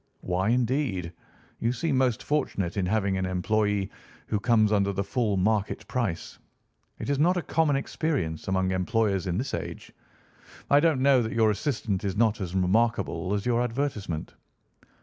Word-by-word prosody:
"Why, 90 +3 0
indeed? 120 - 0 0.5
You 115 - +1
seem 135 +4 -1
most 130 -1 +1
fortunate 100 - -1
in 95 -3 0
having 100 -1 +1
an 95 - -1
employé 100 +2 0 0.3
who 105 - -1
comes 110 -1 +3
under 100 -1 +2
the 100 0 -1
full 105 -2 0
market 105 +2 0
price. 105 -10 -3 0.6
It - - -6
is 140 - 0
not 180 +4 +3
a 175 - -1
common 155 -3 +2
experience 135 - -2
among 95 0 +1
employers 100 0 0
in 90 0 -1
this 130 +5 -3
age. - - -5 0.8
I 145 - +7
don't 155 -4 +2
know 135 -2 +5
that 110 -1 -3
your 110 -2 +4
assistant 105 -4 -2
is 100 -1 -2
not 110 -2 +2
as 90 -1 -4
remarkable 95 -2 +1
as 100 - -3
your 120 -1 +2
advertisement." 115 - -3
110 Hz, 165 wpm, -27 LUFS, 95-125 Hz, 0.8 s, I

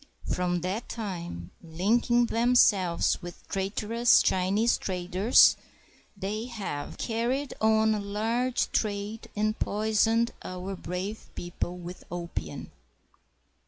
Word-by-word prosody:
From 180 -1 0
that 190 +6 -3
time, 175 - -5
linking 220 +8 +2
themselves 225 -7 +3
with 175 0 -10
traitorous 215 +5 +2
Chinese 195 +5 +2
traders, 185 +4 +4 0.6
they 210 +4 -3
have 205 -12 -5
carried 245 +5 -1
on 220 0 +4
a 210 - -1
large 225 +5 -1
trade 210 +1 -2
and 215 +1 0
poisoned 220 +2 +2
our 185 +1 -5
brave 185 +5 -5
people 175 0 -4
with 180 0 -9
opium. 175 -1 -5
205 Hz, 100 wpm, -28 LUFS, 180-225 Hz, 0.6 s, traders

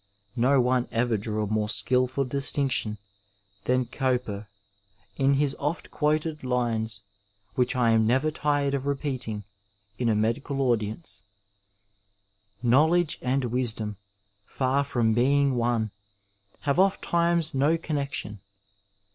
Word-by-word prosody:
No 130 +3 +3
one 125 0 +2
ever 115 0 +1
drew 105 +1 -2
a - - -2
more 105 0 -1
skilful 125 +6 +1
distinction 135 -4 +1 0.7
than 130 0 +2
Gowper 125 -5 -2 0.7
in 135 0 +3
lus 145 -2 +1
oft 150 +4 -3
quoted 155 0 0
lines, 115 -4 -1 0.5
which 125 0 +1
I 120 -2 +3
am 110 -1 +3
never 135 +6 +2
tired 145 -2 0
of 140 0 -2
repeating 130 -7 -3 0.6
in 120 -2 +1
a 110 - +2
medical 115 +6 -1
audience: 110 -3 -1 1.4
Knowledge 155 +7 +3
and 130 +2 0
wiadom, 110 -4 0 0.5
for 135 +2 0
from 120 -5 +1
being 140 +4 +3
one. 120 -3 0 0.7
Have 140 +2 0
oft 195 0 +3
times 170 -1 +1
no 145 +5 +2
connexion. 140 - -3
130 Hz, 120 wpm, -26 LUFS, 115-140 Hz, 1.4 s, No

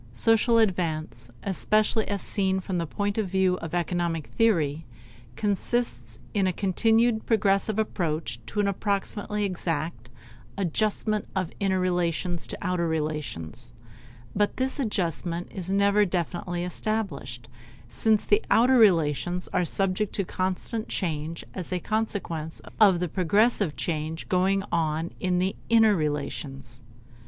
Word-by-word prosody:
Social 225 - +3
advance, 160 - 0
especially 215 +3 +1
as 200 -2 -2
seen 190 -2 0
from 185 -1 -3
the 165 - -2
point 205 +5 -2
of 205 -4 -1
view 190 -1 +2
of 165 +1 -5
economic 170 -2 -1
theory, 165 -10 +1 0.5
consists 200 - -1 0.2
in 195 -2 +2
a - - +2
continued 220 +5 +2
progressive 205 -1 +2
approach 160 - -1
to - - -3
an 205 - +3
approximately 205 +1 -1
exact 165 - -3 0.5
"adjustment 210 +3 0
of 185 -3 -1
inner 190 -2 +1
relations 175 -1 0
to - - -6
outer 180 -2 0
relations", 150 - -4 0.6
but 205 0 +1
this 260 +2 -1
adjustment 175 - -1
is 185 -1 -5
never 200 +1 +4
definitively 175 -1 -2
established, 170 - -3 0.4
since 215 - +2
the 415 +1 +3
"outer 250 +2 +5
relations" 175 -3 +3
are - - +2
subject 195 +3 0
to 200 - +1
constant 190 +5 -2
change 160 -2 -3
as 185 -2 -6
a 180 - 0
consequence 175 -7 -2 0.2
of 195 -5 +6
the 180 - 0
progressive 200 +1 +2
change 160 -1 -3
going 190 +2 +2
on 160 0 0
in 180 -1 +1
the 185 +2 0
"inner 225 -2 +6
relations." 140 -4 -4
185 Hz, 130 wpm, -26 LUFS, 165-210 Hz, 0.6 s, of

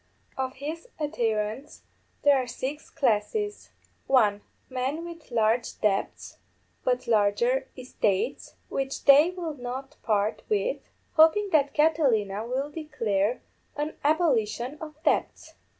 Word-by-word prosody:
Of 260 0 -3
his 310 - -6
adherents 230 -2 -2 0.4
there 285 -2 +5
are 250 - -5
six 275 +5 -5
classes. 275 - -1 0.4
(1) 210 -6 +3 0.3
_Men 265 +6 -2
with 335 -2 -10
large 230 0 +1
debts, 200 -2 -1 0.4
but 250 0 0
larger 225 +4 +2
estates, 250 -1 -1
which 270 0 -3
they 285 +4 +8
will 350 -3 -4
not 260 0 -7
part 210 -1 0
with, 440 +4 +1 0.4
hoping 325 +6 +5
that 285 -3 +2
Catilina 235 -10 +2
will 270 +4 -2
declare 235 -9 -1 0.3
an 300 +1 -3
abolition 280 -4 +1
of 305 -1 -7
debts. - - 0
265 Hz, 115 wpm, -27 LUFS, 225-305 Hz, 0.4 s, they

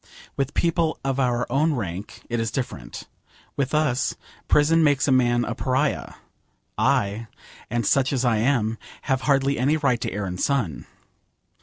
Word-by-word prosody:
With 140 0 -2
people 170 -2 +1
of 135 0 0
our 125 -2 +1
own 150 +4 +2
rank 100 -3 -6
it 120 -1 -2
is 115 0 0
different. 110 - -5 0.5
With 140 +1 -1
us, 135 -5 +1 0.3
prison 160 +2 +4
makes 145 -2 +3
a - - +3
man 120 -2 +3
a 120 - -2
pariah. 130 +4 -1 0.6
I, 105 +3 +1 0.4
and 120 0 -1
such 135 +3 +2
as 130 -2 0
I 115 -2 +3
am, 115 -2 +1 0.2
have 135 -1 0
hardly 140 0 +2
any 145 +5 +2
right 135 -6 +1
to - - -2
air 105 0 -3
and 90 -1 -4
sun. 125 - -1
130 Hz, 160 wpm, -24 LUFS, 115-140 Hz, 0.6 s, prison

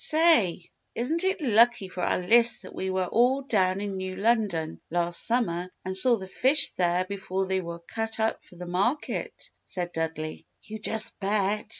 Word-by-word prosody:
"Say, 305 - +3 0.3
isn't 310 +9 0
it 380 -1 -1
lucky 235 -5 +2
for 185 -1 -8
our - - 0
lists 230 +6 +4
that - - -12
we 190 - -5
were 185 0 -2
all 250 +7 +1
down 190 -7 0
in 200 -2 -5
New 185 0 -6
London 195 -7 -1
last 175 0 +1
summer 185 -7 -1 0.2
and 185 0 -4
saw 240 +5 +6
the 195 -4 -8
fish 265 +10 +4
there 180 0 -1
before 190 -1 -4
they 190 0 -2
were 170 -1 -8
cut 225 +6 -4
up 220 0 -2
for - - -18
the 180 +1 -9
market," 200 - -3
said 175 -1 -4
Dudley. 160 -1 -5 0.2
"You 220 0 -9
just 220 +1 +4
bet! 205 +1 -2
195 Hz, 180 wpm, -25 LUFS, 180-235 Hz, 0.3 s, saw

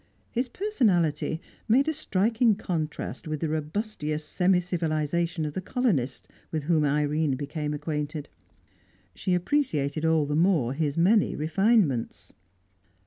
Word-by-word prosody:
His 245 +2 -1
personality 190 - +1 0.3
made 265 +7 +4
a 315 - +1
striking 225 -4 +2
contrast 160 -6 -4
with 155 -1 -3
the 160 - -1
robustious 155 -1 -3
semi 180 +2 +2
civilisation 165 -1 -1
of 150 - -4
the 185 - -3
colonists 185 - -1 0.2
with 155 -2 -3
whom 155 0 +2
Irene 150 0 +1
became 150 +2 -4
acquainted; 150 0 -3 0.9
she 180 - 0
appreciated 165 - 0
all 160 -2 +3
the 145 +1 -2
more 160 -7 +3
his 150 0 -1
many 200 +5 +3
refinements. 160 - +1
160 Hz, 125 wpm, -27 LUFS, 150-195 Hz, 0.9 s, made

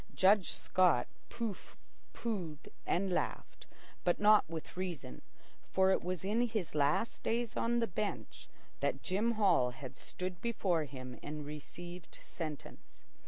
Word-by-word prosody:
Judge 195 0 +5
Scott 180 -4 +3 0.2
pooh 230 -4 -2 0.6
poohed 180 -10 -4 0.2
and 190 +2 +1
laughed, - - -3 0.4
but 175 - +2
not 210 -4 +6
with 165 -1 -6
reason, 175 - -4 0.5
for 190 0 +5
it - - +3
was 180 +1 -3
in 215 +4 +2
his 215 -7 -2
last 150 +9 +2
days 235 0 0
on 235 +1 +1
the 235 - +3
bench 210 +1 -4 0.3
that - - -1
Jim 210 +5 +1
Hall 185 - +4
had 130 +2 -8
stood 180 +3 -5
before 185 -9 +1
him 130 -2 -8
and 150 0 -5
received 170 +4 -8
sentence. 155 -4 -8
180 Hz, 135 wpm, -34 LUFS, 155-210 Hz, 0.6 s, not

